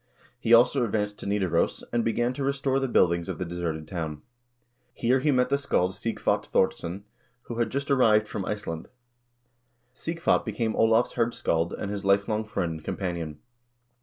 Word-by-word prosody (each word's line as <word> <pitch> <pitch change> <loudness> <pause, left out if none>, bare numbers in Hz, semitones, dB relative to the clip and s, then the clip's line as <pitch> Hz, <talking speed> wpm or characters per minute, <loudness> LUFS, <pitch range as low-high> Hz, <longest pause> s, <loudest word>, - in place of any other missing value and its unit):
He 115 - -2
also 120 +3 +6
advanced 105 -2 -1
to - - -6
Nidaros, 95 -5 0
and 120 -1 +2
began 120 +2 0
to 140 - -4
restore 135 0 +1
the 135 - 0
buildings 85 -7 +2
of - - -3
the 90 - -3
deserted 85 -3 -4
town. 80 -4 -5 0.7
Here 125 +3 +2
he 150 - +1
met 125 -2 +3
the 140 +1 +2
scald 95 -9 +1
Sighvat 110 +5 -1
Thordsson, 90 +4 0 0.4
who 120 -1 -6
had 120 - +1
just 140 +1 -3
arrived 110 -5 +4
from 105 -2 -4
Iceland. 90 -6 -4 1.1
Sighvat 165 +5 0
became 110 0 -2
Olav's 115 +2 +3
hirdscald 85 -8 0
and 100 - -3
his 100 -1 -4
lifelong 100 +2 +2
friend 90 -5 -2
and 80 -1 -7
companion. 85 -5 -4
105 Hz, 165 wpm, -27 LUFS, 90-120 Hz, 1.1 s, also